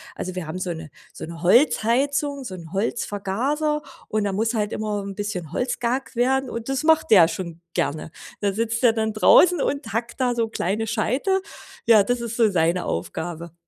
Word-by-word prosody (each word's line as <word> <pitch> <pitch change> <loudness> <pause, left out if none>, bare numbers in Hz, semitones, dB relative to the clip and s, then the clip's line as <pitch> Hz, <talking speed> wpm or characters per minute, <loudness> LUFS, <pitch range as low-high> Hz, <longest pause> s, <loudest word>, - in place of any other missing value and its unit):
Also, 185 0 -5
wir 180 -3 -4
haben 170 +4 -5
so 180 -1 -2
'ne 160 -2 -9 0.2
so - - -9
'ne 165 0 -9
Holzheizung, 275 - +2
so 190 -6 -6
'n 165 0 -11
Holzvergaser, 240 +9 -1 0.3
und 215 -1 0
da 200 - -1
muss 220 +4 0
halt 210 -2 -1
immer 210 -1 -2
'n 195 -1 -6
bisschen 185 -6 -4
Holz 245 +1 -1
gehackt 245 +2 -2
werden 265 +1 +2
und 230 +1 -6
das 270 +2 -1
macht 320 -3 +3
der 180 -6 +7
schon 170 -1 -6
gerne. 155 +2 -2 0.3
Da 200 -1 +1
sitzt 230 +3 -2
der 240 - +7
dann 220 -1 -1
draußen 350 +11 +5
und 255 -7 -2
hackt 235 +3 -3
da 245 -2 +1
so 225 -1 0
kleine 220 +2 -2
Scheite. 260 - 0 0.4
Ja, 220 -3 +6
das 245 +4 -1
ist 235 0 -4
so 220 -3 +4
seine 170 0 +1
Aufgabe. 165 - -4
220 Hz, 195 wpm, -23 LUFS, 185-250 Hz, 0.4 s, der